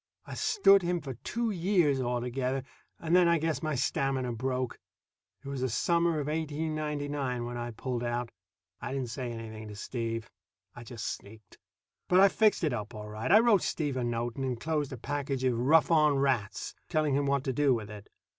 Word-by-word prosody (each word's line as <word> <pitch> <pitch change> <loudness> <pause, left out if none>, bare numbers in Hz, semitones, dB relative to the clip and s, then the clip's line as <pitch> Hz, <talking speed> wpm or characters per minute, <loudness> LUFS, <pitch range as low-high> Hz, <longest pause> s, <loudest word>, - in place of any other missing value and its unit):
I - - -8
stood 200 - +4
him 175 0 0
for 140 -4 -6
two 230 - -2
years 175 -7 +2
altogether, 125 +2 -1 0.4
and 165 +1 +1
then 180 -1 +6
I 170 0 +4
guess 155 -3 -1
my 155 -2 -1
stamina 130 -1 0
broke. 125 +1 -2 0.7
It - - -7
was 140 -2 -4
the 130 - 0
summer 170 +6 +2
of 145 - -2
1899 150 -4 -2
when 120 0 -5
I 120 0 -4
pulled 120 +1 -4
out. 120 0 -2 0.5
I - - -4
didn't 130 -4 -3
say 125 0 -4
anything 110 -1 -7
to 105 - -8
Steve. 115 +1 -4 0.4
I 120 - -9
just 115 -2 -7
sneaked. 110 -2 -8 0.5
But 180 - +5
I 195 +1 +8
fixed 215 -2 +3
it 150 -5 +1
up 110 0 -5
all 105 0 -7
right. 110 +8 -3
I 205 - +9
wrote 225 -6 +4
Steve 145 -4 -1
a 130 - -1
note, 120 0 -2
and 135 - -2
enclosed 140 +3 -1
a 130 - -5
package 140 +1 -3
of 125 -3 +1
"rough 155 +7 +4
on 150 -3 +5
rats," 135 -7 0 0.2
telling 155 -2 +1
him 140 +1 +1
what 140 -1 +1
to 135 -2 -1
do 140 -1 +3
with 105 -2 -6
it. 105 -1 -11
135 Hz, 195 wpm, -30 LUFS, 120-155 Hz, 0.7 s, I